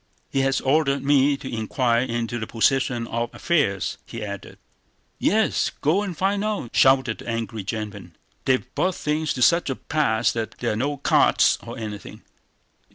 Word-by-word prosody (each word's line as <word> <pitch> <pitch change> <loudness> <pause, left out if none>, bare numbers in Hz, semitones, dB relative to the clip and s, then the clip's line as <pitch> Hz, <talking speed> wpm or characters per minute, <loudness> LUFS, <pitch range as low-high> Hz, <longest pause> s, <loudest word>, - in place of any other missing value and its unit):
"He 135 - 0
has 135 0 +2
ordered 140 0 +2
me 140 0 +3
to 135 - -9
inquire 115 +2 +1
into 120 -1 -2
the 110 - -4
position 120 0 +1
of 115 +1 -2
affairs," 140 - 0
he 115 -2 -7
added. 100 -2 -8 0.6
"Yes, 220 +3 +2
go 165 +8 +2
and 190 -6 -4
find 200 +2 0
out!" 210 - -3
shouted 130 -3 +4
the - - -8
angry 115 -2 -3
gentleman. 100 -4 -6 0.3
"They've 130 -1 +2
brought 185 -1 0
things 150 0 -1
to 125 - +1
such 170 +1 +4
a 135 - -1
pass 120 -8 +1
that 115 -1 -4
there 120 - -1
are - - -1
no 140 +6 -1
carts 140 - +3
or - - -8
anything!... 105 -2 -7
130 Hz, 165 wpm, -23 LUFS, 115-145 Hz, 0.6 s, shouted